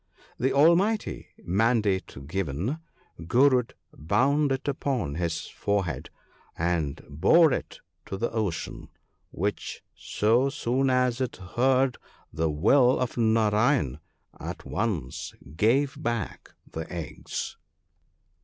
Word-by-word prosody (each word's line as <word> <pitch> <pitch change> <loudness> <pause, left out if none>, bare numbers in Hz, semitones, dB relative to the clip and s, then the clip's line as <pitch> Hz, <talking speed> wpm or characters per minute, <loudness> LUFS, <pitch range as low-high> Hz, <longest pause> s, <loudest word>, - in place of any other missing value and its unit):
The 130 +2 +2
almighty 175 +9 +3 0.2
mandate 100 - +1
given, 95 - -2 0.5
Gurud 125 +2 +3 0.2
bound 140 - +2
it 135 +1 -2
upon 130 - -1
his 85 0 -2
forehead, 100 -5 -2 0.5
and 85 -4 -1
bore 125 - +5
it - - -5 0.3
to 95 - -4
the 115 - -1
Ocean, 105 -8 -3 0.4
which, 100 +4 -3
so 120 +6 +1
soon 135 -1 0
as 125 -1 +2
it 130 - -2
heard 130 +7 +1 0.3
the 80 0 0
will 120 - +4
of 125 - -2
Narayan, 110 - +2 0.4
at - - -7
once 100 - -3 0.2
gave 130 - +2
back 120 -1 -4 0.2
the 80 0 -6
eggs. 85 -3 -5
115 Hz, 105 wpm, -27 LUFS, 90-130 Hz, 0.5 s, bore